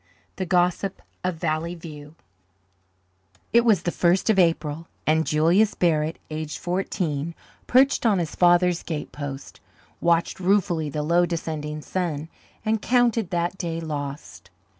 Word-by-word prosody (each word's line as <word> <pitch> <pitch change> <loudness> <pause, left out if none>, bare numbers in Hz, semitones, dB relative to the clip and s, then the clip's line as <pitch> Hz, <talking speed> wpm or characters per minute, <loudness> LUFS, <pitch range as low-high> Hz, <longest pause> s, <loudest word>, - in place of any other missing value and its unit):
The 185 - -3
Gossip 180 +2 +1 0.2
of 180 -1 -1
Valley 165 +1 -2
View 150 -2 -10 1.4
It 235 0 +6
was 220 -5 +3
the 175 - 0
first 180 +6 +2
of 200 - +2
April, 165 -2 +1 0.2
and 160 +1 +2
Julius 170 +8 +3
Barrett, 160 -2 +1
aged 155 0 -4
fourteen, 170 -4 -2 0.3
perched 265 +2 +4
on 220 -4 +3
his 170 -3 -2
father's 175 0 +4
gatepost, 145 -3 -6 0.4
watched 170 +1 +1
ruefully 180 -5 +1
the 150 +1 -3
low 170 +3 +3
descending 155 -3 -4
sun, 165 -4 -3 0.4
and 220 0 +1
counted 235 -5 +2
that 175 +1 -1
day 165 -3 -3
lost. 145 -9 -6
170 Hz, 130 wpm, -24 LUFS, 155-185 Hz, 1.4 s, It